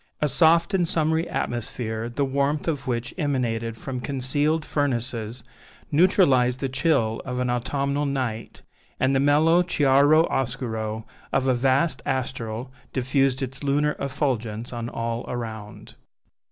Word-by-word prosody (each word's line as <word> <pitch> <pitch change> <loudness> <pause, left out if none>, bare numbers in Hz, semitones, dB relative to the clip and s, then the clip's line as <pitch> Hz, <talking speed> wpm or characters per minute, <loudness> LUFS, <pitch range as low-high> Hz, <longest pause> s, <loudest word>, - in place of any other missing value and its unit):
A 150 - +2
soft 165 +6 +4
and 180 -3 +2
summery 160 +1 0
atmosphere, 115 -1 -3
the 140 +4 -1
warmth 140 +3 0
of 145 -4 -2
which 120 -1 -2
emanated 115 -6 -1
from 130 0 -5
concealed 145 +4 0
furnaces, 120 -4 -2 0.5
neutralized 145 -7 +4
the 135 - -2
chill 130 -5 +1
of 125 -1 -4
an 125 -1 0
autumnal 140 +4 -1
night, 125 -5 -3 0.4
and 130 +1 +2
the - - +3
mellow 155 +5 +4
chiaro 145 -1 +4
oscuro 115 -4 -2 0.3
of 135 -1 +1
a 130 - +3
vast 135 +6 +2
astral 125 -2 -3 0.2
diffused 135 0 +1
its 135 +2 -6
lunar 145 +2 +1
effulgence 125 -5 -2
on 120 -1 -4
all 115 0 -3
around. 110 -3 -6
130 Hz, 130 wpm, -24 LUFS, 120-145 Hz, 0.5 s, soft